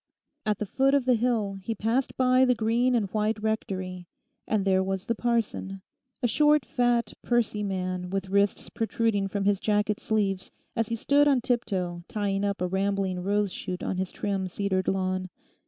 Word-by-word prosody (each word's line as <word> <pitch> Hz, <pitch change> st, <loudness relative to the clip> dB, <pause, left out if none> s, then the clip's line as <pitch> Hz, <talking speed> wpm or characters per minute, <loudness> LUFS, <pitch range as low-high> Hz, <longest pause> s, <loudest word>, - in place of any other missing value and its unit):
At 210 Hz, -2 st, +2 dB
the 210 Hz, -, -3 dB
foot 270 Hz, +7 st, +2 dB
of 275 Hz, -3 st, +2 dB
the 255 Hz, -, +4 dB
hill 220 Hz, -4 st, 0 dB
he 225 Hz, +4 st, -3 dB
passed 230 Hz, +6 st, -1 dB
by 255 Hz, 0 st, +4 dB
the 250 Hz, -1 st, +4 dB
green 235 Hz, +3 st, +2 dB
and 220 Hz, -4 st, +1 dB
white 215 Hz, 0 st, 0 dB
Rectory, 185 Hz, -4 st, -3 dB, 0.4 s
and 210 Hz, -3 st, +1 dB
there 190 Hz, -1 st, +3 dB
was 190 Hz, 0 st, -2 dB
the 235 Hz, -, 0 dB
parson, 220 Hz, -5 st, -2 dB, 0.4 s
a -, -, +4 dB
short 295 Hz, +3 st, +4 dB
fat, 240 Hz, -3 st, +1 dB
pursy 235 Hz, -3 st, +1 dB
man 185 Hz, -2 st, -3 dB
with 195 Hz, 0 st, -2 dB
wrists 200 Hz, +1 st, +1 dB
protruding 225 Hz, -3 st, 0 dB
from 195 Hz, 0 st, -2 dB
his 200 Hz, -1 st, +3 dB
jacket 210 Hz, 0 st, +1 dB
sleeves 195 Hz, -3 st, -1 dB, 0.3 s
as 230 Hz, -2 st, 0 dB
he 230 Hz, -, -2 dB
stood 285 Hz, +5 st, +3 dB
on 275 Hz, -3 st, +4 dB
tip 245 Hz, -1 st, 0 dB
toe 180 Hz, -4 st, -3 dB
tying 200 Hz, -2 st, -1 dB
up 200 Hz, -2 st, -1 dB
a -, -, +1 dB
rambling 190 Hz, 0 st, 0 dB
rose 200 Hz, +1 st, 0 dB
shoot 180 Hz, 0 st, -5 dB
on 185 Hz, -, -2 dB
his 185 Hz, 0 st, -2 dB
trim 195 Hz, -2 st, -2 dB
cedared 190 Hz, 0 st, -1 dB
lawn. 185 Hz, -1 st, -1 dB
205 Hz, 185 wpm, -27 LUFS, 190-230 Hz, 0.4 s, the